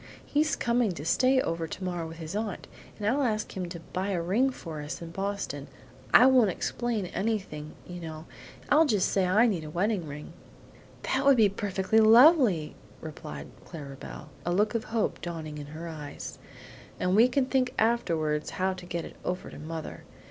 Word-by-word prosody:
He's 305 +2 +1
coming 235 -4 +1
to 150 -3 -7
stay 255 +9 +4
over 165 -4 -2
tomorrow 175 -1 -4
with 165 0 -9
his 165 +3 -6
aunt, 210 -3 -3 0.3
and 210 - -5
I'll 265 +6 +2
ask 215 -5 -1
him 180 -2 -3
to 170 -1 -7
buy 185 +4 -4
a 185 -3 0
ring 200 +11 +2
for 165 - -7
us 150 +1 -5
in 170 -1 -8
Boston. 195 -7 -3 0.4
I 250 - +8
won't 255 -5 +6
explain 230 +3 -2
anything, 190 -7 -3
you 175 0 -8
know; 160 -1 -7 0.4
I'll 310 +2 +5
just 210 -8 +2
say 190 -2 +2
I 210 +6 +5
need 195 -9 0
a 155 - -7
wedding 180 +1 0
ring." 145 +1 -8 0.7
"That 265 - 0
would 275 -2 +6
be 215 -3 +6
perfectly 200 +1 +1
lovely," 225 - +6 0.3
replied 155 -1 -8
Clara 145 -5 -8
Belle, 150 +2 -10
a 175 - -1
look 210 +5 +2
of 230 -1 -1
hope 225 -1 -1
dawning 160 -3 -5
in 145 - -7
her 160 +3 -7
eyes; 150 -3 -7 0.6
"and 180 +1 +1
we 230 +4 +7
can 255 +1 +1
think 255 -1 0
afterwards 165 -10 +1
how 190 +1 +1
to 185 -1 -10
get 170 -1 -3
it - - -11
over 180 0 -3
to - - -10
mother. 160 +1 -6
185 Hz, 185 wpm, -28 LUFS, 165-225 Hz, 0.7 s, I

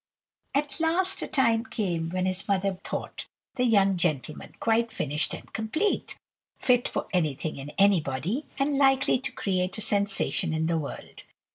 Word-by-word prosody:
"At 285 +1 -1
last, 360 +4 +2
a - - -3
time 230 -4 +2
came 175 -9 -2
when 185 +1 -1
his 185 0 -2
mother 195 -1 0
thought - - -5 0.3
the 250 - 0
young 195 -5 +3
gentleman 155 -4 -2
quite 230 +1 +2
finished 150 -6 0
and - - -13
complete; 220 - -1 0.4
fit 245 -1 +3
for - - -2
anything 155 -4 -1
and 140 +2 -7
anybody, 195 - +1
and 275 +1 +1
likely 270 -2 +4
to 265 0 -2
create 185 -4 -1
a - - -4
sensation 200 -5 +1
in 160 0 0
the 165 0 +1
world. 145 - -8
200 Hz, 155 wpm, -27 LUFS, 170-250 Hz, 0.4 s, likely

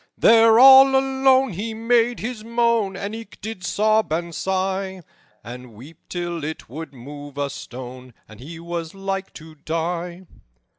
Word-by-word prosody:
"There 225 0 +6
all 270 +1 +8
alone 265 -2 +2
he 220 +5 -5
made 235 +1 +1
his 225 -1 -5
moan, 230 -4 0
And 200 +2 -5
eke 225 -2 -10
did 220 -3 -7
sob 215 +1 +1
and 170 +1 -3
sigh, 190 0 -3 0.4
And 120 0 -10
weep 150 +9 -14
till 175 -2 -4
it 155 +1 -6
would 160 +7 -8
move 145 +2 -11
a 140 -1 -2
stone, 125 -1 -10
And 110 -1 -15
he 160 +6 -10
was 170 0 -6
like 195 0 -4
to 160 0 -12
die. 170 +4 -4
185 Hz, 150 wpm, -22 LUFS, 155-225 Hz, 0.4 s, all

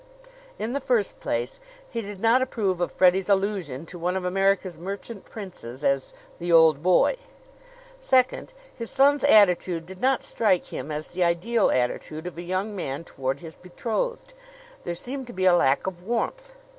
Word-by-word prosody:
In 225 +3 -3
the 280 - -1
first 245 -6 0
place, - - -3 0.3
he 230 - -4
did 205 -2 -8
not 230 +4 +4
approve 205 -8 -1
of 175 - 0
Freddie's 185 +1 +3
allusion 190 -8 0
to 175 +1 -9
one 180 +2 -1
of 185 - -4
America's 195 -1 +1
merchant 200 +3 -7
princes 150 - -9
as 135 -1 +1 0.3
"the 175 0 -2
old 160 -3 +6
boy." 185 - +3 0.8
Second, 260 - +2 0.2
his 230 -1 -5
son's 280 +2 +4
attitude 180 - +4
did 190 +1 -11
not 265 0 +2
strike 195 -6 +1
him 155 - -5
as 150 +1 -4
the 180 0 -1
ideal 190 +7 +2
attitude 140 +6 -1
of 180 - -6
a 170 - -6
young 185 +4 -3
man 140 -5 -4
toward 135 -3 -4
his 165 -2 -9
betrothed. 240 - -4 0.5
There 175 - -3
seemed 260 +7 -5
to 240 - -9
be 185 0 -1
a 185 - +6
lack 140 -5 +3
of 185 -2 -4
warmth. - - -3
190 Hz, 170 wpm, -25 LUFS, 170-230 Hz, 0.8 s, old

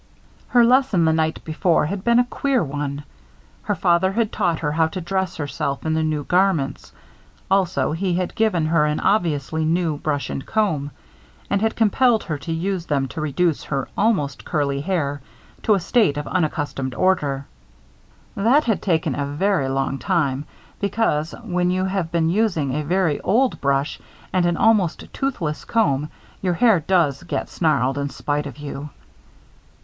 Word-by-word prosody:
Her 240 -1 +5
lesson 250 -8 +3
the 160 - +3
night 160 0 0
before 165 +1 +1
had 190 +4 -4
been 235 0 +4
a 245 - +6
queer 260 +1 0
one. 145 0 -4 0.6
Her - - -1
father 175 +2 +2
had 225 0 0
taught 175 -6 0
her 150 -2 -2
how 160 +1 +2
to 160 - -5
dress 190 +1 -2
herself 145 -1 -3
in 160 - +1
the 160 - +1
new 155 -2 -1
garments. 180 -4 0 0.6
Also, 190 -4 +2
he 175 +2 -1
had 180 0 -2
given 215 -8 +1
her 155 -1 +3
an 150 - -1
obviously 160 -6 0
new 165 -1 0
brush 145 -2 -2
and 135 - -4
comb, 160 -10 0 0.6
and 200 - +2
had 225 0 +1
compelled 230 +1 +3
her 155 -3 -4
to 165 - -6
use 175 +1 -2
them 140 -2 0
to 155 - -5
reduce 155 +2 0
her 135 -2 -3
almost 195 -10 0
curly 140 -4 -1
hair 145 -5 -1 0.4
to 215 - +3
a - - +1
state 185 - +2
of 145 - -3
unaccustomed 145 -7 -2
order. 145 -7 +1 0.9
That 245 +9 +3
had 220 -4 0
taken 160 -6 0
a 140 +1 -2
very 145 -1 0
long 135 0 -1
time, 145 -7 0 0.3
because, 200 -7 0
when 180 -4 0
you 185 +1 0
have 190 -4 -2
been 165 -1 +1
using 175 -10 +1
a 150 - -1
very 175 -1 +1
old 255 +4 +1
brush 140 +1 0 0.3
and 180 -2 +3
an 175 -1 0
almost 210 -7 +2
toothless 170 - -2
comb 150 -10 +1 0.3
your 180 -2 0
hair 220 -1 +4
does 160 -4 +1
get 175 - -4
snarled 140 -5 +1
in 140 0 -2
spite 145 +1 -2
of 135 - -10
you. 145 0 -6
165 Hz, 170 wpm, -22 LUFS, 145-195 Hz, 0.9 s, a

